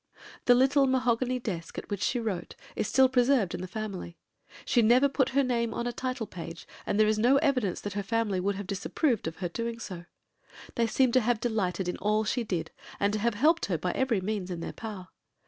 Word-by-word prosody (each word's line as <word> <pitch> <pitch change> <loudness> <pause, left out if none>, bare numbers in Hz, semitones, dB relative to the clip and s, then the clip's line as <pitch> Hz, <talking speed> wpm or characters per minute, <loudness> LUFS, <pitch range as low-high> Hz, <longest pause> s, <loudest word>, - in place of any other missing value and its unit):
The 245 - +7
little 270 +2 +4
mahogany 255 -1 +1
desk 180 -9 -5
at - - -5
which 200 - -2
she 245 - +1
wrote 200 -7 -4 0.2
is 215 - -1
still 265 +3 +5
preserved 250 -6 +2
in - - -4
the 185 - -5
family. 190 -4 -6 0.5
She 240 - +3
never 245 +5 +5
put 265 -1 +1
her 280 - +5
name 235 -3 0
on 235 - -2
a 245 - -2
title 255 -1 -3
page, 165 -4 -9 0.2
but - - 0
there 215 - +5
is 215 0 +1
no 250 +5 +5
evidence 265 - +1
that 205 - -5
her 205 - -2
family 210 -2 0
would 200 +2 0
have 200 +1 -5
disapproved 200 - -1
of 160 - -4
her 180 -2 -4
doing 230 +5 -3
so. 180 -6 -7 0.7
They 230 -1 +1
seem 255 +2 +2
to 255 - +5
have 235 0 +1
delighted 195 -6 -1
in 180 - -2
all 215 +2 +1
she 245 +3 -1
did, 175 -7 -3 0.3
and 200 +1 +1
to 215 - 0
have 230 0 0
helped 315 +9 +3
her 180 -4 0
by 180 +3 -2
every 240 -5 0
means 195 -1 -3
in 175 -2 -4
their - - -5
power. 205 -5 -7
220 Hz, 225 wpm, -28 LUFS, 190-250 Hz, 0.7 s, The